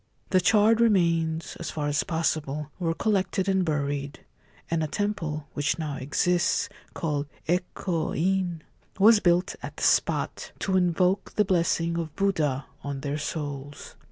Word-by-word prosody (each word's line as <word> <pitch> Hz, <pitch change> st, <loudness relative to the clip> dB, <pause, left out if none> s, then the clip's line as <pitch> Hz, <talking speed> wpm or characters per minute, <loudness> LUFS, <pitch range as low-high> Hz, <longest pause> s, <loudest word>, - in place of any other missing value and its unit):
The 185 Hz, -, +4 dB
charred 215 Hz, +4 st, +4 dB
remains 170 Hz, -7 st, +2 dB
(as 170 Hz, -, -4 dB
far 150 Hz, -2 st, -2 dB
as 145 Hz, 0 st, +1 dB
possible) 150 Hz, -3 st, -2 dB
were 165 Hz, -2 st, 0 dB
collected 190 Hz, -1 st, 0 dB
and 190 Hz, -1 st, +2 dB
buried, 145 Hz, -3 st, -2 dB, 0.5 s
and 165 Hz, -1 st, +1 dB
a -, -, -1 dB
temple 165 Hz, -6 st, -2 dB
(which 145 Hz, 0 st, 0 dB
now 150 Hz, -4 st, -3 dB
exists), 175 Hz, +9 st, +1 dB, 0.3 s
called 150 Hz, -4 st, -2 dB, 0.2 s
4 175 Hz, +2 st, +3 dB
Eko 175 Hz, -2 st, -3 dB
In,' 180 Hz, -2 st, 0 dB, 0.3 s
was 215 Hz, +2 st, +7 dB
built 175 Hz, -1 st, +2 dB
at -, -, -8 dB
the -, -, -5 dB
spot, -, -, +1 dB
to 190 Hz, -, -1 dB
invoke 180 Hz, +1 st, +1 dB
the 210 Hz, -, +3 dB
blessing 170 Hz, -2 st, +1 dB
of 160 Hz, -3 st, -5 dB
Buddha 155 Hz, -9 st, 0 dB, 0.2 s
on 140 Hz, -1 st, -4 dB
their 145 Hz, +1 st, -2 dB
souls. 145 Hz, -2 st, -5 dB
165 Hz, 150 wpm, -26 LUFS, 150-185 Hz, 0.5 s, was